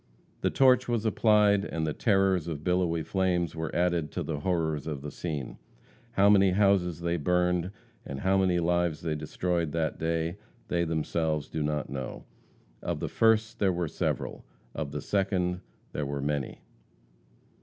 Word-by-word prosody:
The -, -, +2 dB
torch 130 Hz, -1 st, +4 dB
was 115 Hz, -2 st, 0 dB
applied, 105 Hz, -2 st, +4 dB
and 80 Hz, -4 st, -2 dB
the 75 Hz, -, -1 dB
terrors 95 Hz, -5 st, +2 dB
of 75 Hz, -3 st, -4 dB
billowy 90 Hz, -2 st, +1 dB
flames 90 Hz, -2 st, 0 dB
were 80 Hz, 0 st, -3 dB
added 85 Hz, -3 st, +1 dB
to -, -, -2 dB
the 75 Hz, -3 st, -3 dB
horrors 80 Hz, -3 st, -1 dB
of 70 Hz, -3 st, -4 dB
the 75 Hz, -, -5 dB
scene. 75 Hz, -7 st, -5 dB, 0.5 s
How 100 Hz, -2 st, +4 dB
many 100 Hz, -2 st, +6 dB
houses 95 Hz, -4 st, +2 dB
they 85 Hz, 0 st, 0 dB
burned, 90 Hz, +2 st, +1 dB, 0.3 s
and 70 Hz, 0 st, -6 dB
how 95 Hz, +1 st, +3 dB
many 90 Hz, -2 st, +2 dB
lives 85 Hz, -2 st, +1 dB
they 80 Hz, -, -1 dB
destroyed 80 Hz, +1 st, -2 dB
that 80 Hz, -1 st, -1 dB
day, 80 Hz, +2 st, -1 dB, 0.3 s
they 85 Hz, -1 st, +1 dB
themselves 80 Hz, -1 st, -1 dB
do 80 Hz, -, -3 dB
not 75 Hz, -1 st, -2 dB
know; 65 Hz, -2 st, -5 dB, 0.6 s
of -, -, -2 dB
the -, -, -3 dB
first 110 Hz, -1 st, +2 dB
there 95 Hz, -2 st, +3 dB
were 85 Hz, -1 st, -1 dB
several, -, -, -3 dB, 0.3 s
of -, -, -4 dB
the -, -, -4 dB
second 90 Hz, -3 st, 0 dB, 0.3 s
there 75 Hz, -2 st, -2 dB
were 70 Hz, 0 st, -3 dB
many. 70 Hz, -1 st, -3 dB
85 Hz, 165 wpm, -28 LUFS, 80-95 Hz, 0.6 s, many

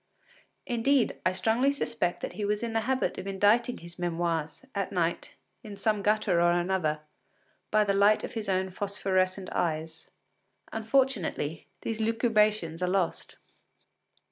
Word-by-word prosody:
Indeed, 250 Hz, +2 st, +1 dB
I -, -, +3 dB
strongly 225 Hz, +9 st, +2 dB
suspect 230 Hz, -10 st, -2 dB
that -, -, -4 dB
he 205 Hz, +3 st, -4 dB
was 210 Hz, +2 st, 0 dB
in 230 Hz, -1 st, -3 dB
the 225 Hz, -, +2 dB
habit 265 Hz, 0 st, 0 dB
of 190 Hz, -, -6 dB
inditing 205 Hz, +5 st, +2 dB
his 170 Hz, +1 st, -12 dB
memoirs, 170 Hz, -, -2 dB
at 200 Hz, -2 st, -2 dB
night, 170 Hz, -3 st, -1 dB, 0.3 s
in 205 Hz, -2 st, -9 dB
some 210 Hz, +1 st, +1 dB
gutter 205 Hz, -4 st, +2 dB
or 175 Hz, 0 st, +4 dB
another, 175 Hz, -4 st, 0 dB, 0.7 s
by 215 Hz, 0 st, +4 dB
the 200 Hz, -1 st, +1 dB
light 200 Hz, +2 st, +4 dB
of -, -, -5 dB
his 220 Hz, -3 st, -4 dB
own 190 Hz, 0 st, 0 dB
phosphorescent 190 Hz, -1 st, -1 dB
eyes. 160 Hz, -1 st, -2 dB, 0.6 s
Unfortunately, 225 Hz, -, 0 dB, 0.2 s
these 225 Hz, -1 st, -3 dB
lucubrations 215 Hz, -6 st, +1 dB
are 180 Hz, -, +1 dB
lost. 185 Hz, -2 st, -1 dB
200 Hz, 145 wpm, -28 LUFS, 175-220 Hz, 0.7 s, or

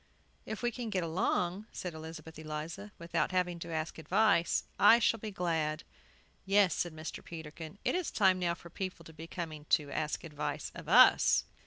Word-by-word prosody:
"If 220 Hz, +2 st, -5 dB
we 240 Hz, -, +2 dB
can 240 Hz, -1 st, -5 dB
get 190 Hz, -4 st, 0 dB
along," 180 Hz, +3 st, 0 dB
said 180 Hz, -2 st, -5 dB
Elizabeth 160 Hz, 0 st, -9 dB
Eliza, 160 Hz, +6 st, -6 dB
"without 170 Hz, -2 st, -1 dB
having 180 Hz, -2 st, 0 dB
to 170 Hz, -, -7 dB
ask 160 Hz, 0 st, -3 dB
advice, 175 Hz, +1 st, +3 dB, 0.2 s
I 205 Hz, +4 st, +8 dB
shall 230 Hz, -1 st, +2 dB
be 215 Hz, -, -5 dB
glad!" 165 Hz, -5 st, -1 dB, 0.6 s
"Yes," 195 Hz, -3 st, +4 dB
said 175 Hz, -2 st, -2 dB
Mr. 155 Hz, +1 st, -7 dB
Peterkin, 160 Hz, +2 st, -8 dB
"It -, -, +2 dB
is 360 Hz, -2 st, -1 dB
time 190 Hz, -3 st, +3 dB
now 170 Hz, -1 st, 0 dB
for 170 Hz, -, -14 dB
people 185 Hz, -2 st, -5 dB
to 160 Hz, -, -12 dB
be 160 Hz, +1 st, -9 dB
coming 160 Hz, -3 st, -6 dB
to 150 Hz, -1 st, +2 dB
ask 155 Hz, +1 st, -2 dB
advice 150 Hz, -3 st, -4 dB
of -, -, -9 dB
us." -, -, +7 dB
170 Hz, 180 wpm, -32 LUFS, 160-195 Hz, 0.6 s, I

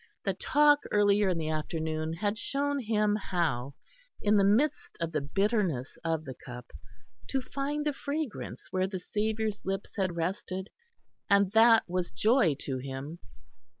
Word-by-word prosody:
The -, -, +1 dB
talk 295 Hz, 0 st, +4 dB
earlier 205 Hz, -1 st, +4 dB
in 180 Hz, -, 0 dB
the 160 Hz, -1 st, -2 dB
afternoon 155 Hz, 0 st, -2 dB
had 205 Hz, +5 st, -1 dB
shown 280 Hz, +5 st, -1 dB
him 210 Hz, -3 st, +1 dB
how, 145 Hz, -, -1 dB, 0.4 s
in 210 Hz, 0 st, +3 dB
the 200 Hz, -, +5 dB
midst 245 Hz, +10 st, +2 dB
of 165 Hz, -1 st, -2 dB
the 155 Hz, -2 st, -1 dB
bitterness 185 Hz, -, 0 dB
of 160 Hz, -1 st, -1 dB
the 130 Hz, -, -6 dB
Cup, 125 Hz, -1 st, -9 dB, 0.6 s
to 270 Hz, -, +1 dB
find 280 Hz, +3 st, -3 dB
the 295 Hz, -, +1 dB
fragrance 285 Hz, -2 st, -5 dB
where 185 Hz, 0 st, +1 dB
the 190 Hz, -1 st, -4 dB
Saviour's 215 Hz, +2 st, -2 dB
lips 195 Hz, +1 st, -4 dB
had 185 Hz, -3 st, 0 dB
rested 185 Hz, +2 st, -3 dB, 0.6 s
and 200 Hz, -1 st, +4 dB
that 225 Hz, +1 st, +6 dB
was 180 Hz, 0 st, -1 dB
joy 190 Hz, -, +3 dB
to 130 Hz, -2 st, -3 dB
him. 135 Hz, +5 st, -6 dB
195 Hz, 150 wpm, -29 LUFS, 160-220 Hz, 0.6 s, that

